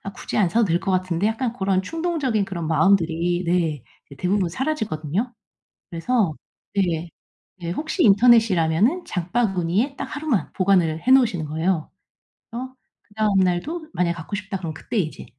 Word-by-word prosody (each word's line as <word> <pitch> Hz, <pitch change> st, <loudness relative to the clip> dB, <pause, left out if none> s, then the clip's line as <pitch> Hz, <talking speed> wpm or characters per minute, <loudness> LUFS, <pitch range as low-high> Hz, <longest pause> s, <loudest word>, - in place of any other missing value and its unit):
'아 195 Hz, -, -5 dB
굳이 -, -, -6 dB
안 195 Hz, -5 st, +4 dB
사도 230 Hz, +6 st, +2 dB
될 170 Hz, 0 st, +2 dB
것 -, -, -2 dB
같은데.' 185 Hz, 0 st, 0 dB
약간 230 Hz, +1 st, -2 dB
고런 190 Hz, -3 st, 0 dB
충동적인 305 Hz, -, -1 dB
그런 170 Hz, -4 st, -4 dB
마음들이 175 Hz, 0 st, +2 dB
네 165 Hz, -6 st, 0 dB, 0.3 s
이 -, -, -10 dB
대부분 185 Hz, 0 st, 0 dB
사라지거든요. 220 Hz, -, -2 dB, 0.6 s
그래서 180 Hz, 0 st, 0 dB, 0.4 s
네. 170 Hz, -4 st, 0 dB, 0.5 s
네. 170 Hz, -, -4 dB
혹시 315 Hz, -, -1 dB
인터넷이라면은 220 Hz, -, +4 dB
장바구니에 190 Hz, -, 0 dB
딱 -, -, -4 dB
하루만 290 Hz, -9 st, -1 dB
보관을 180 Hz, -4 st, +2 dB
해 -, -, +3 dB
놓으시는 225 Hz, -12 st, +3 dB
거예요. 160 Hz, +2 st, -1 dB, 0.6 s
그래서 255 Hz, +3 st, -6 dB, 0.3 s
그다음 210 Hz, -2 st, 0 dB
날도 275 Hz, -, -1 dB
만약 175 Hz, -1 st, +1 dB
'갖고 170 Hz, +4 st, -6 dB
싶다.' 195 Hz, 0 st, -4 dB
그러면 165 Hz, -4 st, -5 dB
그때 225 Hz, -, -5 dB
이제 160 Hz, -5 st, -2 dB
190 Hz, 355 characters per minute, -23 LUFS, 170-230 Hz, 0.6 s, 안